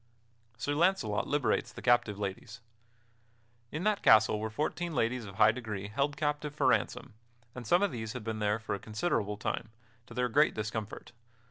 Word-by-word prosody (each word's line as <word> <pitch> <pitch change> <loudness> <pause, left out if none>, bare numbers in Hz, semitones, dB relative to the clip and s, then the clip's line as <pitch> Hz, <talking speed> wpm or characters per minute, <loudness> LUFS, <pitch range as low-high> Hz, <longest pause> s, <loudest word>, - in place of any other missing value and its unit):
[Sidenote: - - -19
Sir 145 - 0
Launcelot 150 - +1
liberates 145 -3 0
the - - -10
captive 120 -4 +3
ladies] 100 +3 -5 1.1
In 155 +4 -4
that 210 -1 +1
castle 110 -1 +5
were 110 +1 -3
fourteen 155 +7 -2
ladies 120 -1 0
of 100 -1 -10
high 105 +3 +6
degree 110 -4 -5
held 140 +6 -1
captive 150 -1 -2
for 145 - 0
ransom; 130 -1 +1 0.4
and 120 -3 -8
some 175 - +4
of 205 - +1
these 110 -1 -5
had 125 -3 -6
been 110 0 -3
there 105 0 +1
for 110 -2 -4
a 100 - -3
considerable 105 -3 -1
time, 110 +2 -3 0.4
to 115 - -12
their 125 0 +1
great 145 +6 +3
discomfort. 110 0 -5
115 Hz, 180 wpm, -31 LUFS, 110-145 Hz, 1.1 s, high